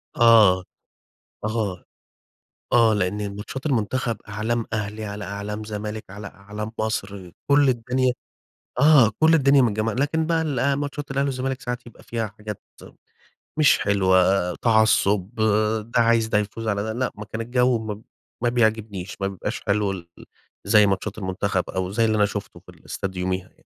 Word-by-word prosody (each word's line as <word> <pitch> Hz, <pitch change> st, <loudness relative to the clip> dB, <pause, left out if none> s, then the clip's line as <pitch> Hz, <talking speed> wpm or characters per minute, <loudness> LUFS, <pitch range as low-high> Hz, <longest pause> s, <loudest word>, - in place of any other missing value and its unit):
آه. 110 Hz, -6 st, +6 dB, 0.8 s
آه، 105 Hz, -4 st, -2 dB, 0.9 s
آه 115 Hz, -2 st, +5 dB
لأن 100 Hz, +1 st, -2 dB
ماتشات 130 Hz, +7 st, -6 dB
المنتخب 125 Hz, -1 st, 0 dB
أعلام 110 Hz, +3 st, -2 dB
أهلي، 105 Hz, 0 st, -3 dB
على 105 Hz, 0 st, -6 dB
أعلام 100 Hz, +2 st, -5 dB
زمالك، 105 Hz, 0 st, -5 dB
على 100 Hz, +1 st, -8 dB
أعلام 105 Hz, +2 st, -7 dB
مصر، 100 Hz, -4 st, -3 dB, 0.2 s
كل 140 Hz, -1 st, +5 dB
الدنيا 125 Hz, +1 st, +1 dB, 0.7 s
آه 140 Hz, -6 st, +6 dB
كل 160 Hz, +1 st, +5 dB
الدنيا 140 Hz, -3 st, +5 dB
متجمّعة. 110 Hz, -1 st, 0 dB
لكن 145 Hz, +5 st, 0 dB
بقى 165 Hz, 0 st, +1 dB
الأ 140 Hz, -2 st, 0 dB
ماتشات 145 Hz, 0 st, -4 dB
الأهلي 140 Hz, +1 st, 0 dB
والزمالك 135 Hz, -1 st, -3 dB
ساعات 125 Hz, 0 st, -5 dB
يبقى 115 Hz, -, -15 dB
فيها 115 Hz, -2 st, -3 dB
حاجات 105 Hz, -2 st, -7 dB, 0.9 s
مش 155 Hz, -2 st, +5 dB
حلوة، 95 Hz, -2 st, +2 dB
تعصُّب، 110 Hz, -2 st, +2 dB, 0.6 s
ده -, -, +3 dB
عايز 115 Hz, -1 st, +3 dB
ده 110 Hz, -1 st, +1 dB
يفوز 105 Hz, +2 st, -3 dB
على 100 Hz, -1 st, 0 dB
ده، 110 Hz, +1 st, -3 dB
لأ 125 Hz, +1 st, -1 dB
ما 105 Hz, -, -8 dB
كان 110 Hz, +2 st, -5 dB
الجو 125 Hz, +1 st, +2 dB
ما 110 Hz, -1 st, -6 dB, 0.4 s
ما 120 Hz, -, +3 dB
بيعجبنيش، 110 Hz, -5 st, -1 dB
ما 95 Hz, -, +1 dB
بيبقاش 95 Hz, -2 st, -5 dB
حلو 100 Hz, -1 st, 0 dB
ال 90 Hz, -3 st, -7 dB, 0.6 s
زي 105 Hz, -1 st, +6 dB
ماتشات 100 Hz, +2 st, -2 dB
المنتخب 95 Hz, -1 st, -2 dB
أو 95 Hz, 0 st, -3 dB
زي 115 Hz, +2 st, +2 dB
اللي 110 Hz, -, +1 dB
أنا 105 Hz, -, +4 dB
شُفته 105 Hz, 0 st, -6 dB
في -, -, -20 dB
الاستاد 95 Hz, -1 st, -6 dB
يوميها 90 Hz, 0 st, -2 dB
يعني. -, -, -30 dB
110 Hz, 155 wpm, -23 LUFS, 100-120 Hz, 0.9 s, آه